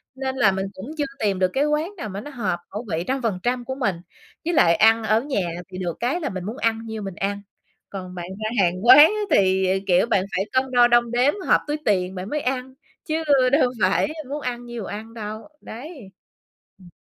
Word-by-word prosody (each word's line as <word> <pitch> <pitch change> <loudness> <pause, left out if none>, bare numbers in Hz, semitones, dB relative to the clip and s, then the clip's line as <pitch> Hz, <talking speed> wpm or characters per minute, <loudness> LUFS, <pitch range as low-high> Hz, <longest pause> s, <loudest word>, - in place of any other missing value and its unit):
nên 265 0 -3
là 215 -7 +4
mình 190 0 -2
cũng 190 - -9
chưa 295 - 0
tìm 200 -3 0
được 185 - +3
cái 280 +2 +2
quán 300 +5 -1
nào 215 - -5
mà 195 +1 -6
nó 295 - -9
hợp 200 -10 -2
khẩu 210 +4 -6
vị 160 +1 -1
100% 245 -1 -1
của 260 - -4
mình. 210 -9 0 0.5
Với 345 - 0
lại 170 - +5
ăn 225 +3 +4
ở 220 +1 +2
nhà 270 -4 -2 0.3
thì 185 - -7
được 175 -3 -3
cái 255 +9 0
là - - -2
mình 185 -2 -5
muốn 220 +7 -5
ăn 225 -3 -1
nhiêu 220 -1 -5
mình 195 -3 -6
ăn. 200 +2 -2 0.5
Còn 185 -2 -7
bạn 175 -1 -6 0.2
ra 215 - -1
hàng 180 +4 -1
quán 255 +3 +10
á 425 +8 +6 0.2
thì, 190 -1 +3 0.2
kiểu, 180 +2 +4
bạn 195 -5 +1
phải 195 - 0
cân 260 0 0
đo 245 -1 +6
đong 240 -1 +3
đếm, 250 +4 +3
hợp - - +4
túi 295 +1 -1
tiền 190 -2 +1
bạn 185 +2 -6
mới 300 - -1
ăn, 260 0 -3 0.3
chứ 320 0 -1 0.3
đâu 275 -2 +4
phải 185 +8 +2 0.2
muốn 295 +2 -4
ăn 245 -2 -4
nhiêu 240 -3 -6
ăn 220 +3 -7
đâu, 215 -1 -7
đấy. 280 +6 -9 0.8
Ừm. 180 -2 -15
225 Hz, 220 wpm, -23 LUFS, 190-260 Hz, 0.8 s, quán